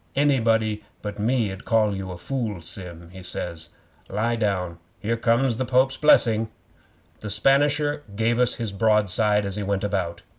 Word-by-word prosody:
'"Anybody 115 -6 +2 0.2
but 105 0 -5
me 115 -1 +1
'ud 95 +1 -9
call 110 -3 +2
you 95 -1 -5
a 90 - -6
fool, 110 0 -3
Sim," 85 0 -6
he 95 0 -10
says. 85 -2 -4 0.4
"Lie 110 +4 0
down. 90 -6 -1 0.2
Here 115 +3 -1
comes 115 +1 +1
the 130 - 0
Pope's 130 +2 +2
Blessing!" 115 -7 +4 0.7
'The 105 - -6
Spanisher 145 +6 +2
gave 115 +2 +1
us 125 0 +3
his 115 -3 -4
broadside 105 0 +2
as 100 0 -2
he - - -2
went 100 0 -1
about. 95 -4 -2
105 Hz, 160 wpm, -24 LUFS, 95-120 Hz, 0.7 s, Blessing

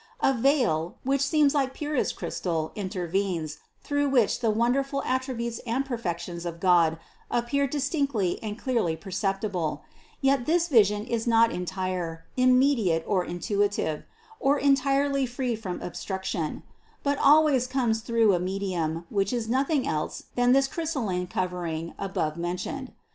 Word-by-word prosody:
A 270 - +4
veil, 230 - +1
which 275 +1 +1
seems 285 0 +3
like 270 -2 0
purest 295 -2 -1
crystal 160 -3 -3
intervenes, 185 -5 -2 0.2
through 285 -1 0
which 245 -6 +3
the 230 - +1
wonderful 270 +5 +1
attributes 255 -3 -2
and 250 +3 -2
perfections 175 -8 -4
of 170 -1 -5
God 170 -3 +4 0.3
appear 260 +4 +1
distinctly 280 - 0
and 210 -1 -5
clearly 230 - 0
perceptible; 190 -3 -2 0.4
yet 270 -2 +2
this 340 +2 +2
vision 210 -5 +4
is 235 -1 -2
not 230 0 +5
entire, 180 -2 -3
immediate 255 - +3
or 190 -3 +1
intuitive, 175 -2 -1 0.4
or 280 +2 +3
entirely 275 0 +2
free 245 0 -2
from 200 -5 -5
obstruction, 185 -3 -4 0.4
but 285 -1 0
always 290 -3 +5
comes 245 -4 0
through 225 -2 +3
a 175 - +2
medium, 180 -3 -2
which 195 -1 +1
is 235 -3 -2
nothing 270 +4 +1
else 155 -1 -2
than 245 0 +3
this 270 +1 +5
crystalline 245 - -2
covering 175 -3 -3
above 160 -5 -2
men 175 +1 -2
tioned. 265 +7 -5
225 Hz, 135 wpm, -27 LUFS, 180-270 Hz, 0.4 s, not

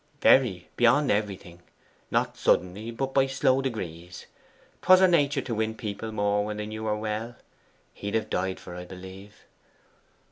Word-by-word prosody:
'VERY, 100 -10 +4
beyond 125 +4 +4
everything. 100 -4 -3 0.5
Not - - 0
suddenly, 95 +5 0
but 135 +3 -3
by 135 -1 +3
slow 135 0 +2
degrees. 90 -9 -6 0.6
'Twas 185 0 +7
her 190 - +6
nature 145 -5 +2
to 125 - -5
win 110 0 -1
people 110 0 -5
more 105 -1 +1
when 105 0 -4
they 105 - -4
knew 110 +1 -6
her 105 -1 0
well. 110 +2 -4 0.6
He'd 100 +1 -5
have 110 - 0
died 95 +1 -2
for 90 - -11
her, - - -8
I 90 - -8
believe. 95 +2 -12
110 Hz, 165 wpm, -27 LUFS, 95-125 Hz, 0.6 s, Twas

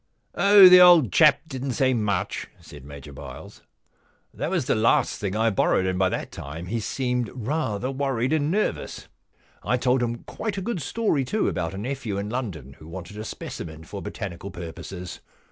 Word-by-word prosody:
Oh, 200 -1 +8
the 180 0 +9
old 170 - +7
chap 155 -2 +5
didn*t 130 -2 -4
say 130 -1 +2
much,' 105 -6 -1
said - - -13
Major 70 0 -11
Byles. 70 -2 -10 0.4
* - - -40
That - - -3
was 175 -7 0
the - - +2
last 115 +1 +2
thing 100 -2 -3
I 110 +1 +2
borrowed, 95 -1 +2
and 95 0 -1
by 95 -1 +3
that - - -4
time 80 +4 -7
he 115 +6 -2
seemed 125 0 -2
rather 125 -2 -2
worried 135 -1 -1
and 150 -1 +1
nervous. 210 +5 -2 0.5
I 125 - 0
told 125 +1 +1
him 120 -1 -3
quite 215 -3 -5
a - - -2
good 215 -6 -3
story, 160 -2 0
too, 215 +12 -1
about 85 +1 -2
a - - -6
nephew 120 -2 -4
in 100 +2 -4
London 90 - -5
who 75 - -13
wanted 90 +3 -9
a - - -4
specimen 80 -6 -7
for 100 +4 -8
botanical 95 +1 -6
purposes. 90 +1 -8
115 Hz, 185 wpm, -24 LUFS, 95-135 Hz, 0.5 s, the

